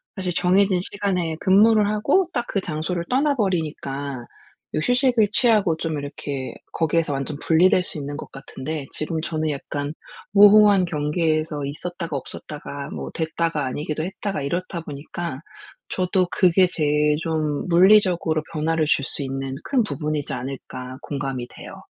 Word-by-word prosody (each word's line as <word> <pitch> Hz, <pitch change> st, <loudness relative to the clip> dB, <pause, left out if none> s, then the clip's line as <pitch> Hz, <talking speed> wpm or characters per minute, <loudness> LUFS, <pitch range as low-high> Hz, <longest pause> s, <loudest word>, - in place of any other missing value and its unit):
사실 185 Hz, -2 st, -2 dB
정해진 185 Hz, +1 st, +3 dB
시간에 180 Hz, -5 st, -1 dB
근무를 210 Hz, +2 st, +5 dB
하고 275 Hz, -, +2 dB
딱 240 Hz, -, -1 dB
그 195 Hz, -, -1 dB
장소를 170 Hz, +1 st, -3 dB
떠나버리니까 160 Hz, -, -1 dB, 0.5 s
이 -, -, -1 dB
휴식을 245 Hz, -, +3 dB
취하고 210 Hz, -8 st, +3 dB
좀 160 Hz, -1 st, -2 dB
이렇게 140 Hz, -1 st, -5 dB, 0.2 s
거기에서 165 Hz, -1 st, +1 dB
완전 140 Hz, +1 st, -3 dB
분리될 180 Hz, +4 st, +4 dB
수 170 Hz, -, -3 dB
있는 145 Hz, 0 st, -5 dB
것 -, -, -8 dB
같은데 140 Hz, +2 st, -6 dB
지금 160 Hz, +1 st, -2 dB
저는 155 Hz, -1 st, -2 dB
약간 145 Hz, 0 st, -4 dB, 0.4 s
모호한 205 Hz, -1 st, +7 dB
경계에서 155 Hz, -1 st, -1 dB
있었다가 165 Hz, +3 st, -5 dB
없었다가 145 Hz, +1 st, -7 dB
뭐 -, -, -5 dB
됐다가 160 Hz, -1 st, -1 dB
아니기도 150 Hz, +4 st, -3 dB
했다가 195 Hz, 0 st, -4 dB
이렇다 170 Hz, +4 st, -3 dB
보니까 150 Hz, 0 st, -6 dB, 0.5 s
저도 185 Hz, 0 st, +1 dB
'그게 185 Hz, 0 st, +4 dB
제일 150 Hz, -3 st, +1 dB
좀 155 Hz, -2 st, -1 dB
물리적으로 175 Hz, -3 st, +4 dB
변화를 160 Hz, 0 st, +1 dB
줄 145 Hz, -, +2 dB
수 140 Hz, -, -3 dB
있는 135 Hz, 0 st, -4 dB
큰 265 Hz, -3 st, +1 dB
부분이지 150 Hz, -7 st, -3 dB
않을까.' 130 Hz, 0 st, -6 dB
공감이 135 Hz, -3 st, -4 dB
돼요. -, -, -11 dB
160 Hz, 330 characters per minute, -23 LUFS, 145-185 Hz, 0.5 s, 모호한